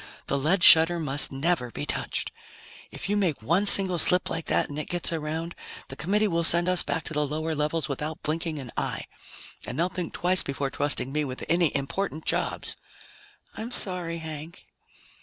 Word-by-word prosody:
The -, -, -1 dB
lead 165 Hz, +7 st, +1 dB
shutter 165 Hz, +1 st, +7 dB
must 145 Hz, -2 st, +1 dB
never 135 Hz, -1 st, 0 dB
be 75 Hz, -10 st, -6 dB
touched! -, -, -3 dB, 0.6 s
If -, -, -6 dB
you 205 Hz, -, 0 dB
make 175 Hz, -, -1 dB
one 175 Hz, -, +2 dB
single 190 Hz, -3 st, +6 dB
slip 180 Hz, +3 st, +3 dB
like 165 Hz, 0 st, -3 dB
that -, -, +1 dB
and 145 Hz, +1 st, -6 dB
it 155 Hz, -, -4 dB
gets 175 Hz, -1 st, 0 dB
around, 160 Hz, +2 st, -4 dB, 0.4 s
the -, -, -6 dB
Committee 210 Hz, +5 st, +1 dB
will 170 Hz, -3 st, 0 dB
send 170 Hz, +1 st, +4 dB
us 180 Hz, -1 st, +7 dB
back 145 Hz, +3 st, -2 dB
to -, -, -7 dB
the 150 Hz, 0 st, +1 dB
lower 155 Hz, +2 st, -3 dB
levels 150 Hz, +1 st, -1 dB
without 150 Hz, +2 st, -4 dB
blinking 160 Hz, +1 st, -2 dB
an 130 Hz, -5 st, -8 dB
eye. -, -, -3 dB, 0.6 s
And -, -, -6 dB
they'll 170 Hz, +3 st, +1 dB
think 180 Hz, -1 st, -5 dB
twice 185 Hz, +1 st, +2 dB
before 140 Hz, 0 st, -3 dB
trusting 145 Hz, -2 st, 0 dB
me 150 Hz, +1 st, 0 dB
with 130 Hz, -3 st, -6 dB
any 170 Hz, -1 st, +2 dB
important 155 Hz, +4 st, -3 dB
jobs." -, -, -1 dB, 0.8 s
"I'm 225 Hz, +2 st, -5 dB
sorry, 180 Hz, -7 st, 0 dB
Hank." 160 Hz, 0 st, -8 dB
160 Hz, 185 wpm, -26 LUFS, 150-175 Hz, 0.8 s, shutter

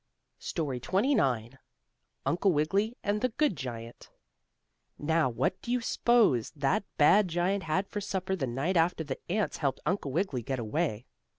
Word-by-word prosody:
STORY 145 Hz, -7 st, -3 dB
XXIX 135 Hz, -, +1 dB, 0.7 s
UNCLE 185 Hz, +3 st, +2 dB
WIGGILY 195 Hz, +9 st, +1 dB
AND 205 Hz, +1 st, 0 dB
THE 255 Hz, -, +2 dB
GOOD 285 Hz, -, +1 dB
GIANT 120 Hz, -4 st, -7 dB, 0.9 s
Now 160 Hz, -1 st, +1 dB
what 125 Hz, +2 st, -1 dB
do 240 Hz, -, -5 dB
you 250 Hz, -, +2 dB
s'pose 230 Hz, -, +3 dB
that 145 Hz, +9 st, +1 dB
bad 190 Hz, +7 st, +6 dB
giant 180 Hz, +3 st, 0 dB
had 185 Hz, +5 st, 0 dB
for 205 Hz, -, -4 dB
supper 190 Hz, -1 st, -2 dB
the 140 Hz, -8 st, -2 dB
night 140 Hz, +10 st, 0 dB
after 165 Hz, 0 st, +2 dB
the 140 Hz, -3 st, -5 dB
ants 210 Hz, +1 st, 0 dB
helped 140 Hz, -4 st, -1 dB
Uncle 170 Hz, -4 st, -1 dB
Wiggily 150 Hz, -5 st, -1 dB
get 130 Hz, +3 st, -3 dB
away? 120 Hz, 0 st, -2 dB
165 Hz, 155 wpm, -29 LUFS, 135-200 Hz, 0.9 s, bad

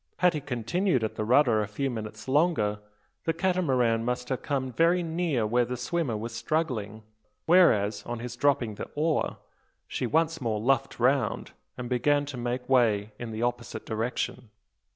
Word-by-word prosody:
Had 180 Hz, -1 st, +4 dB
he 150 Hz, -, -3 dB
continued 135 Hz, -, 0 dB
at 110 Hz, -, -1 dB
the 110 Hz, -, -3 dB
rudder 120 Hz, -1 st, +4 dB
a 105 Hz, -, -2 dB
few 130 Hz, +6 st, -2 dB
minutes 110 Hz, -1 st, -7 dB
longer, 135 Hz, -8 st, +2 dB, 0.5 s
the 165 Hz, -, +1 dB
Catamaran 135 Hz, -11 st, +1 dB
must 125 Hz, +1 st, -2 dB
have 130 Hz, -, -2 dB
come 130 Hz, -3 st, -2 dB
very 170 Hz, +6 st, +3 dB
near 160 Hz, -8 st, 0 dB
where 120 Hz, +3 st, +2 dB
the 125 Hz, +1 st, -4 dB
swimmer 125 Hz, -2 st, -1 dB
was 115 Hz, +2 st, -5 dB
struggling; 115 Hz, -5 st, -2 dB, 0.4 s
where 180 Hz, +1 st, +7 dB
as, 105 Hz, 0 st, -1 dB
on 120 Hz, 0 st, -4 dB
his 120 Hz, +1 st, -6 dB
dropping 125 Hz, -4 st, +1 dB
the -, -, -7 dB
oar, 155 Hz, +1 st, 0 dB, 0.5 s
she 125 Hz, -, -2 dB
once 160 Hz, +3 st, +1 dB
more 110 Hz, -3 st, -1 dB
luffed 125 Hz, +3 st, +1 dB
round, 130 Hz, +3 st, +1 dB, 0.3 s
and 125 Hz, -1 st, -5 dB
began 145 Hz, +4 st, +2 dB
to 140 Hz, -1 st, -7 dB
make 125 Hz, +1 st, -3 dB
way 110 Hz, -5 st, +3 dB
in 120 Hz, -, -5 dB
the 110 Hz, +1 st, -3 dB
opposite 120 Hz, -2 st, -3 dB
direction. 115 Hz, +1 st, -3 dB
125 Hz, 170 wpm, -28 LUFS, 115-150 Hz, 0.5 s, where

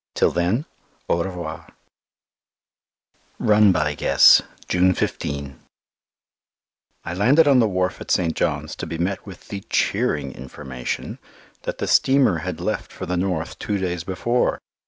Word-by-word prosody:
Till -, -, +3 dB
then, 90 Hz, -, 0 dB, 0.4 s
au 85 Hz, -, +1 dB
revoir. 85 Hz, -4 st, -6 dB, 1.7 s
Run 105 Hz, -1 st, +5 dB
by 75 Hz, -4 st, 0 dB
Guess, -, -, +6 dB, 0.3 s
June 90 Hz, 0 st, +3 dB
15 70 Hz, -1 st, -3 dB, 1.5 s
I 85 Hz, -, -4 dB
landed 135 Hz, -, +4 dB
on 135 Hz, -3 st, +5 dB
the 115 Hz, -, +4 dB
wharf 90 Hz, -2 st, -1 dB
at -, -, -9 dB
St. 85 Hz, -3 st, +1 dB
John's -, -, -2 dB
to -, -, -5 dB
be 80 Hz, +1 st, -4 dB
met 90 Hz, +3 st, -2 dB
with 95 Hz, -3 st, -12 dB
the 100 Hz, -, -4 dB
cheering 70 Hz, -3 st, 0 dB
information 65 Hz, -1 st, -6 dB, 0.5 s
that -, -, -3 dB
the -, -, -2 dB
steamer 130 Hz, -10 st, +3 dB
had 90 Hz, 0 st, -5 dB
left 105 Hz, +5 st, -3 dB
for -, -, -7 dB
the 90 Hz, -, -2 dB
north 90 Hz, -2 st, -2 dB
two 105 Hz, -, -2 dB
days 90 Hz, -3 st, -3 dB
before. 120 Hz, +7 st, 0 dB
90 Hz, 140 wpm, -22 LUFS, 80-100 Hz, 1.7 s, Guess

